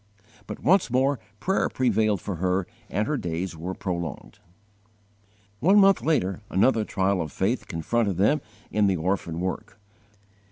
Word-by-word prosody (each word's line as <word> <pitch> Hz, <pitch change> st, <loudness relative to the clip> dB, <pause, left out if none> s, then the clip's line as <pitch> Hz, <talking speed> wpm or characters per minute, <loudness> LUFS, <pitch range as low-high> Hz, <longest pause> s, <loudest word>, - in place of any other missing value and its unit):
But -, -, -7 dB
once 180 Hz, -2 st, +4 dB
more 130 Hz, +2 st, +2 dB, 0.2 s
prayer 190 Hz, -, +1 dB
prevailed 110 Hz, -6 st, +1 dB
for 95 Hz, -4 st, -4 dB
her 90 Hz, +2 st, 0 dB, 0.2 s
and 105 Hz, +3 st, -1 dB
her 150 Hz, -1 st, 0 dB
days 85 Hz, -2 st, -3 dB
were 90 Hz, +4 st, -5 dB
prolonged. 85 Hz, -5 st, -5 dB, 1.2 s
One 190 Hz, +8 st, +5 dB
month 195 Hz, -1 st, +6 dB
later 95 Hz, -, 0 dB
another 110 Hz, +3 st, +3 dB
trial 95 Hz, -2 st, 0 dB
of 80 Hz, -3 st, -5 dB
faith 110 Hz, +7 st, -1 dB
confronted 100 Hz, +3 st, -1 dB
them 120 Hz, +10 st, +3 dB, 0.3 s
in 105 Hz, -1 st, +3 dB
the 95 Hz, -, +2 dB
orphan 85 Hz, -1 st, -2 dB
work. 95 Hz, +1 st, -4 dB
100 Hz, 145 wpm, -25 LUFS, 90-130 Hz, 1.2 s, month